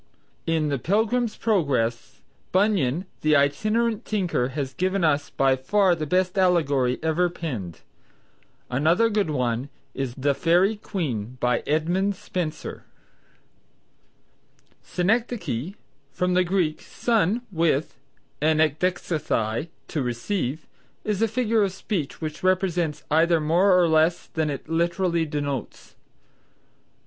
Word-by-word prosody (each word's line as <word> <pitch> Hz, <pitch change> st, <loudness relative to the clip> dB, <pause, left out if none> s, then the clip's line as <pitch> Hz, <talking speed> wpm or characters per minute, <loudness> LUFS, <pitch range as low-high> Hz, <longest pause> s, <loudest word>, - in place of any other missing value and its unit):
In 160 Hz, -2 st, +1 dB
the 140 Hz, -2 st, -1 dB
"Pilgrim's 220 Hz, -, 0 dB
Progress," 130 Hz, -, 0 dB, 0.3 s
Bunyan, 185 Hz, -, +2 dB, 0.2 s
the 155 Hz, 0 st, +3 dB
itinerant 215 Hz, +11 st, +1 dB
tinker, 180 Hz, -, 0 dB
has 135 Hz, 0 st, -4 dB
given 185 Hz, +5 st, 0 dB
us 145 Hz, -2 st, +2 dB
by 135 Hz, -1 st, +2 dB
far 185 Hz, +8 st, +2 dB
the 155 Hz, -3 st, -3 dB
best 185 Hz, +3 st, +1 dB
allegory 145 Hz, -9 st, +2 dB
ever 165 Hz, +2 st, +2 dB
penned. 120 Hz, -, -6 dB, 0.9 s
Another 165 Hz, -, +2 dB
good 205 Hz, -5 st, +1 dB
one 125 Hz, -2 st, -1 dB, 0.2 s
is 135 Hz, -3 st, -4 dB
"The 140 Hz, +1 st, +1 dB
Faerie 180 Hz, +8 st, +2 dB
Queen" 130 Hz, -, -4 dB
by 125 Hz, -1 st, +1 dB
Edmund 175 Hz, +6 st, +1 dB
Spenser. 170 Hz, -4 st, -5 dB, 2.0 s
Synecdoche 185 Hz, -, -1 dB, 0.4 s
(from 180 Hz, 0 st, 0 dB
the 185 Hz, 0 st, +4 dB
Greek, 175 Hz, -4 st, 0 dB
sun 225 Hz, 0 st, 0 dB
with, 160 Hz, -5 st, 0 dB, 0.4 s
and 155 Hz, 0 st, +3 dB
ekdexesthai, 155 Hz, -6 st, 0 dB, 0.2 s
to 150 Hz, -, -2 dB
receive), 130 Hz, -, -2 dB, 0.4 s
is 210 Hz, -1 st, -1 dB
a 225 Hz, -, +4 dB
figure 225 Hz, 0 st, +1 dB
of 195 Hz, -2 st, +1 dB
speech 185 Hz, -6 st, -4 dB
which 155 Hz, 0 st, -6 dB
expresses 180 Hz, -5 st, +1 dB
either 165 Hz, +2 st, +4 dB
more 175 Hz, +5 st, +4 dB
or 175 Hz, -, +4 dB
less 160 Hz, +2 st, +2 dB
than 160 Hz, -1 st, -2 dB
it 140 Hz, 0 st, -5 dB
literally 170 Hz, +1 st, 0 dB
denotes. 145 Hz, -4 st, -4 dB
165 Hz, 115 wpm, -24 LUFS, 140-190 Hz, 2.0 s, the